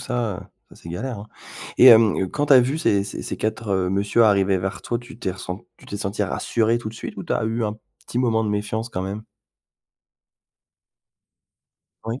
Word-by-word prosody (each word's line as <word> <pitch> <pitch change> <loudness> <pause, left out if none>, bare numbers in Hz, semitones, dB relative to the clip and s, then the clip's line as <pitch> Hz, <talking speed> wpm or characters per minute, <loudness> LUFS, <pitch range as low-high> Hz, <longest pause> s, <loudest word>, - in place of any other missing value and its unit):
ça, 115 -6 -2
heu, - - -8 0.3
ça - - -16
c'est - - -10
galère 110 +8 -4
hein. 105 - -10 0.5
Et, 130 - +8
hem, 110 -5 +6
quand 145 0 -1
tu - - +4
as 130 - +9
vu 130 +5 0
ces 100 -10 +2
ces 100 - -6
ces - - -4
4, 110 +1 -3
heu, 95 -2 +1
monsieur 100 +4 +2
arriver 100 -2 +3
vers 95 0 -4
toi, 120 - -2
tu 120 0 -12
t'es 95 - -2
ressen 90 0 -6 0.2
tu - - -18
t'es 100 - -5
senti 100 0 -2
rassuré 115 0 0
tout 120 - -5
de 110 - -10
suite, - - -7
ou - - -5
tu - - -3
as - - 0
eu 115 +1 -1
un 105 0 -3 0.3
petit 120 - -3
moment 115 -3 +2
de 105 - -1
méfiance 105 +2 -2
quand 95 -6 -4
même? 100 +3 -5 2.8
Oui. 115 +3 -4
110 Hz, 210 wpm, -23 LUFS, 100-120 Hz, 2.8 s, as